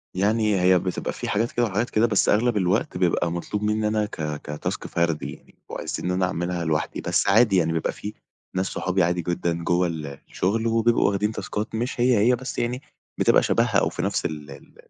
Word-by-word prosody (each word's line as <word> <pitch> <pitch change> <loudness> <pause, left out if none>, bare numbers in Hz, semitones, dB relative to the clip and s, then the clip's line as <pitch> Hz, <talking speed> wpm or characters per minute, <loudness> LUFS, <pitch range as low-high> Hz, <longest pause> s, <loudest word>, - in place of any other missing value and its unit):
يعني 105 +1 +2
هي 90 0 +5
بتبقى 90 0 -3
في - - -5
حاجات 115 +3 0
كده 120 - +1
وحاجات 110 +3 -1
كده، 110 +2 +3
بس 105 -4 +2
أغلب 115 +1 +3
الوقت 95 0 0
بيبقى 85 -1 +1
مطلوب 105 +4 -3
مني 105 0 +1
أنا 105 0 +1
ك 105 - -8 0.3
كtask 75 - -4
فردي 85 -2 -1
يعني، - - -18
وعايزين - - -4
إن 90 - 0
أنا 90 0 +1
أعملها 90 -1 -2
لوحدي. 75 -1 -1
بس - - +1
عادي 105 0 +5
يعني، 80 -2 +2
بيبقى 80 - -1
في 105 +1 -7 0.4
ناس 95 - +1
صحابي 95 0 0
عادي 90 +1 +1
جدًا 85 0 -1
جوّا 90 +1 +2
الشغل، 85 +8 -2
وبيبقوا 115 +1 +3
واخدين 105 +2 0
تاسكات 110 0 -4
مش 120 +2 -3
هي، 125 -2 +4
هي، 120 +5 +4
بس 130 +2 -7
يعني 125 +3 -2 0.4
بتبقى - - +4
شبهها - - +2
أو - - +1
في - - -5
نفس - - -1
ال 75 -2 -5
ال 70 - -14
95 Hz, 200 wpm, -24 LUFS, 85-110 Hz, 0.4 s, هي